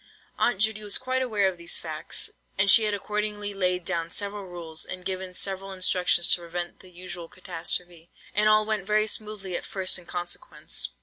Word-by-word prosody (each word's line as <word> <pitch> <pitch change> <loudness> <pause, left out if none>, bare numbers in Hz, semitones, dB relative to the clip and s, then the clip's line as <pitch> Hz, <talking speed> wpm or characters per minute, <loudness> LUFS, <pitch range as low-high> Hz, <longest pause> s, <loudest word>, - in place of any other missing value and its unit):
Aunt 240 - +3
Judy 215 0 +2
was 205 -1 +1
quite 255 0 0
aware 215 -6 +2
of 185 -2 -2
these 170 - 0
facts, - - -3 0.3
and 195 0 +6
she 220 - +8
had 210 - +1
accordingly 210 0 -2
laid 180 -2 +1
down 165 -2 0
several 200 +1 -3
rules, 165 -3 -5
and 185 -1 -5
given 185 -1 -3
several 195 +1 -1
instructions 180 -2 +4
to 175 - +1
prevent 175 +1 -4
the 185 - -13
usual 175 -1 -5
catastrophe; 175 -1 -4 0.2
and 210 +1 +4
all 215 0 +5
went 210 -3 -1
very 215 0 +4
smoothly 210 -4 -3
at - - -2
first 190 -1 0
in 175 - -16
consequence. 175 - -3
190 Hz, 185 wpm, -27 LUFS, 175-210 Hz, 0.3 s, she